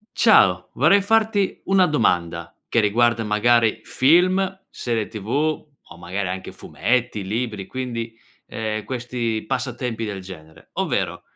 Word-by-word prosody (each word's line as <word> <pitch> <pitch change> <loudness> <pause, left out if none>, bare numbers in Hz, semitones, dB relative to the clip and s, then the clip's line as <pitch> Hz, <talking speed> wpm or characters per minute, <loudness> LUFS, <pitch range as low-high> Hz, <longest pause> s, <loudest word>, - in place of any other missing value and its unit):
Ciao, 90 - +4
vorrei 160 +10 +4
farti 215 -1 +1
una 190 -1 +4
domanda 85 - 0 0.2
che 115 - +2
riguarda 115 +2 +2
magari 110 +1 +2
film, 185 +6 +3
serie 115 -3 -2
TV, 110 -2 -9
o 150 - -3
magari 90 +3 -4
anche 95 +1 -5
fumetti, 120 -4 -1
libri, 105 -1 -3
quindi, 115 -2 -5 0.3
ehm, 110 -1 -4
questi 120 -3 -3
passatempi 125 -3 -3
del 100 -3 -5
genere, 80 -4 -13
ovvero: - - -2
115 Hz, 120 wpm, -22 LUFS, 105-135 Hz, 0.3 s, Ciao